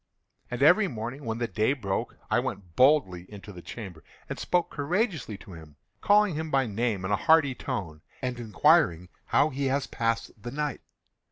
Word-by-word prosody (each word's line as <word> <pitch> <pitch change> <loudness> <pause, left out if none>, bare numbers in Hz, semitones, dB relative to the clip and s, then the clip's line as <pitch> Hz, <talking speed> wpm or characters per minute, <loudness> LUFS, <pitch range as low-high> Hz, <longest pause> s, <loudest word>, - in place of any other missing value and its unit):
And - - -2
every 215 -2 +6
morning, 120 +1 -6
when 110 0 -2
the 120 0 -1
day 110 +4 +1
broke, 100 -9 -3
I - - +4
went 90 -5 -5
boldly 115 - +3
into 105 0 -10
the 90 - -10
chamber, 95 -5 -9 0.2
and - - -5
spoke 175 -1 0
courageously 155 - -1
to 95 - -13
him, 80 -3 -12 0.3
calling 205 -2 +4
him 160 +1 -3
by 135 -2 +2
name 110 -3 -1
in 95 - -2
a - - +4
hearty 160 +1 +4
tone, 80 -10 -5 0.2
and 125 -2 -3
inquiring 115 - +3 0.2
how 150 - +3
he 140 +1 -2
has 135 +1 +1
passed 115 0 -1
the 120 - -6
night. 145 +1 -3
120 Hz, 180 wpm, -27 LUFS, 100-150 Hz, 0.3 s, every